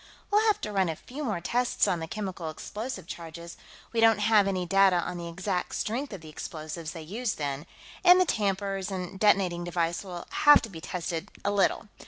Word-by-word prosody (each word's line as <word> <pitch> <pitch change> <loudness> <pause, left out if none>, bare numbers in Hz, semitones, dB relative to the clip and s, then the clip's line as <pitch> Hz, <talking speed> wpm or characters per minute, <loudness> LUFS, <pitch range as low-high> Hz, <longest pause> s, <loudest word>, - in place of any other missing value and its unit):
We'll 425 +2 +4
have 425 - +3
to 210 - -3
run 190 -3 +2
a 160 - -2
few 275 - -8
more 210 -10 -2
tests 245 +7 +1
on 175 - +1
the 160 - -5
chemical 185 -4 -4
explosive 210 +4 -6
charges 170 -1 -8 0.4
we 230 - 0
don't 225 -2 +6
have 210 -1 +4
any 185 -2 -1
data 195 0 +5
on 175 0 -2
the 170 - -5
exact 185 +1 -2
strength 250 +6 -2
of 195 -5 -7
the 160 - -12
explosives 155 +1 -6
they 165 -2 -7
used 215 +8 -3
then 145 +1 -3 0.4
and 360 0 +8
the 370 - +5
tampers 195 - -1
and 190 0 -5
detonating 190 -5 +3
device 170 +1 -1
will 180 -3 -7 0.2
need 295 - +9
to 225 - -5
be 165 -5 -9
tested 170 +2 -4 0.2
a 200 - +2
little. 205 +2 +1
190 Hz, 205 wpm, -28 LUFS, 170-210 Hz, 0.4 s, need